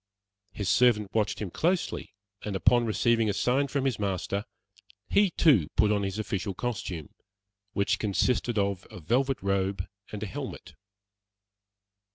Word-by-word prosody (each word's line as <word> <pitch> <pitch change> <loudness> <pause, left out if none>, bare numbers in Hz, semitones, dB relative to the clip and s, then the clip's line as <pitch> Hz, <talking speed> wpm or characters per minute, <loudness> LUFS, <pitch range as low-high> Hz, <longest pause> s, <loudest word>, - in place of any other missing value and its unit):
His 100 - -4
servant 105 -5 +3
watched 105 -2 0
him 100 -5 -4
closely, 175 - -1 0.3
and 105 -2 -4
upon 120 +7 +3
receiving 115 0 +2
a - - +1
sign 125 +7 +1
from 140 0 -1
his 125 -6 0
master, 100 0 -2 0.6
he 200 -1 +4
too 135 - +4
put 105 -1 +4
on 105 -1 +2
his 95 0 -3
official 105 -3 -3
costume, 95 - -4 0.6
which 100 0 +1
consisted 115 +3 +1
of 100 -2 -1
a - - -10
velvet 130 - +1
robe 100 -1 0 0.3
and 105 0 -5
a - - -1
helmet. 95 - -7
105 Hz, 145 wpm, -28 LUFS, 100-120 Hz, 0.6 s, he